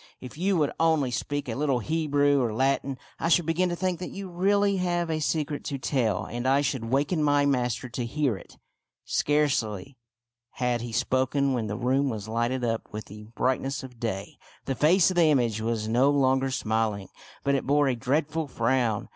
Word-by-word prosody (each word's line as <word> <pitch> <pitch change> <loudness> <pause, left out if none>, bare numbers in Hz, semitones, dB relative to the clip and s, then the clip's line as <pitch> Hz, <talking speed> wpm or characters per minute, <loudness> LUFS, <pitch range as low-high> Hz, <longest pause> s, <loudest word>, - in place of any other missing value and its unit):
If 125 - -10
you 185 +4 +1
would 150 -3 +1
only 160 -5 +2
speak 145 +4 -3
a 115 - -2
little 140 0 +1
Hebrew 145 +1 +1
or 115 -3 -1
Latin, 135 +1 0 0.2
I 165 - 0
should 175 -1 +4
begin 175 +3 +1
to 175 - -2
think 180 -1 -1
that 180 - -5
you 195 -1 -7
really 200 +3 +2
have 175 -2 0
a 155 - -1
secret 150 -1 -1
to 140 - -3
tell, 125 -7 0
and 120 +2 -4
I 135 +2 +4
should 135 -5 -2
waken 140 +7 0
my 145 -1 +3
master 125 -3 0
to 120 +1 -4
hear 140 -2 0
it." - - -13 0.5
Scarcely 130 -6 0 0.5
had 125 -2 -1
he 120 0 -6
spoken 130 +3 +1
when 115 -4 -1
the 105 +1 -3
room 130 +3 +1
was 110 -3 -5
lighted 120 +3 -1
up 115 -1 -2
with 105 0 -6
the 105 +1 -11
brightness 135 +2 -1
of 125 -3 -11
day. 100 -5 -4 0.3
The 135 - -1
face 170 +8 +4
of 180 - -4
the 170 - +6
image 120 -7 +1
was 110 -1 -1
no 125 +5 +3
longer 135 -1 +2
smiling, 110 -5 -1 0.3
but 140 - +1
it 135 -2 -1
bore 145 0 +3
a 130 - +1
dreadful 150 +5 -1
frown. 120 -3 0
135 Hz, 195 wpm, -26 LUFS, 120-150 Hz, 0.5 s, the